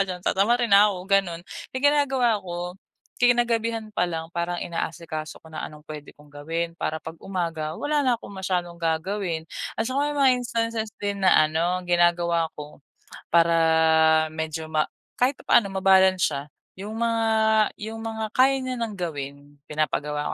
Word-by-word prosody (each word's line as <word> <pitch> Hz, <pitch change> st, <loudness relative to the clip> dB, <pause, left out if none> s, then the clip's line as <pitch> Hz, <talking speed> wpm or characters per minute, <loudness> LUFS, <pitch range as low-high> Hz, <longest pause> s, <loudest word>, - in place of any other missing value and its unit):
diyan, 180 Hz, -1 st, -5 dB
tatamarin 235 Hz, +5 st, +2 dB
na 205 Hz, +1 st, +8 dB
ako, 195 Hz, -3 st, -3 dB
gano'n. 195 Hz, -4 st, +2 dB, 0.3 s
Kaya -, -, -5 dB
yung 285 Hz, -, +4 dB
ginagawa 270 Hz, -4 st, +2 dB
ko, 175 Hz, -1 st, -5 dB, 0.6 s
kinagabihan 230 Hz, -2 st, +2 dB
pa 180 Hz, -, +2 dB
lang 165 Hz, -2 st, -4 dB
parang 175 Hz, +1 st, -2 dB
inaasikaso 160 Hz, -2 st, -5 dB
ko 160 Hz, -, -16 dB
na 155 Hz, -1 st, -6 dB
anong 150 Hz, 0 st, -11 dB
pwede 150 Hz, -1 st, -8 dB
kong 150 Hz, 0 st, -20 dB
gawin 165 Hz, +3 st, -3 dB
para 160 Hz, -1 st, -2 dB
'pag 160 Hz, -, -8 dB
umaga 165 Hz, -5 st, -3 dB
wala 295 Hz, 0 st, 0 dB
na 250 Hz, -2 st, +3 dB
akong 200 Hz, -, -11 dB
masyadong 180 Hz, -2 st, -1 dB
gagawin. 165 Hz, 0 st, -2 dB, 0.3 s
At -, -, 0 dB
saka 280 Hz, +3 st, 0 dB
may -, -, -4 dB
mga 270 Hz, -2 st, +6 dB
instances 230 Hz, -2 st, -2 dB
din 200 Hz, -1 st, -3 dB
na 185 Hz, -, +6 dB, 0.2 s
ano, 170 Hz, +4 st, 0 dB
ginagawa 175 Hz, -1 st, +2 dB
ko 150 Hz, -1 st, -10 dB, 0.5 s
para 170 Hz, 0 st, +5 dB, 0.8 s
medyo 160 Hz, 0 st, -4 dB
ma 155 Hz, -1 st, +2 dB, 0.3 s
kahit 255 Hz, +3 st, +3 dB
papaano 205 Hz, -, +4 dB
mabalance 190 Hz, -1 st, +4 dB
siya. 140 Hz, -, -3 dB, 0.4 s
Yung 210 Hz, +3 st, -6 dB
mga 230 Hz, -1 st, +1 dB, 0.6 s
yung 220 Hz, +1 st, -5 dB
mga 220 Hz, -1 st, -3 dB
kaya 270 Hz, +1 st, +5 dB
niya 255 Hz, 0 st, -3 dB
ng 225 Hz, -2 st, -3 dB
gawin, 145 Hz, -3 st, -6 dB
pinapagawa 150 Hz, -1 st, -2 dB
180 Hz, 160 wpm, -25 LUFS, 160-225 Hz, 0.8 s, na